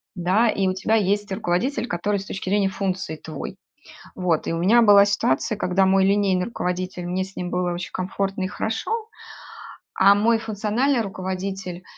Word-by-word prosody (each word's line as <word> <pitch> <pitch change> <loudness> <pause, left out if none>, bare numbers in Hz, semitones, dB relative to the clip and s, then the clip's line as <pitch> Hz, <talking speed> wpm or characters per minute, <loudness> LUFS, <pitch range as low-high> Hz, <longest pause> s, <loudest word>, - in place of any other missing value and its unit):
да, 190 +6 +2
и 195 -2 0
у - - 0
тебя 190 +4 0
есть 205 0 +1
руководитель, 220 +6 -1
который 200 +4 -1
с - - -10
точки 190 -1 -5
зрения 200 0 +2
функций 190 -4 -3
твой. 155 +5 -7 0.6
Вот. 175 -4 0
И - - -1
у - - -1
меня 215 +8 +5
была 205 -3 +7
ситуация, 200 -1 0
когда 190 0 +2
мой 190 0 +4
линейный 195 -2 +2
руководитель 180 -4 -4
мне 180 +2 -1
с 190 +1 -12
ним 180 0 -4
было 180 0 0
очень 175 +1 -6
комфортно 195 +1 -2
и - - 0
хорошо. 220 +3 -3 1.1
А 195 +1 +7
мой 225 +2 +2
функциональный 225 +5 0
руководитель- 190 -2 -5
195 Hz, 170 wpm, -23 LUFS, 180-205 Hz, 1.1 s, была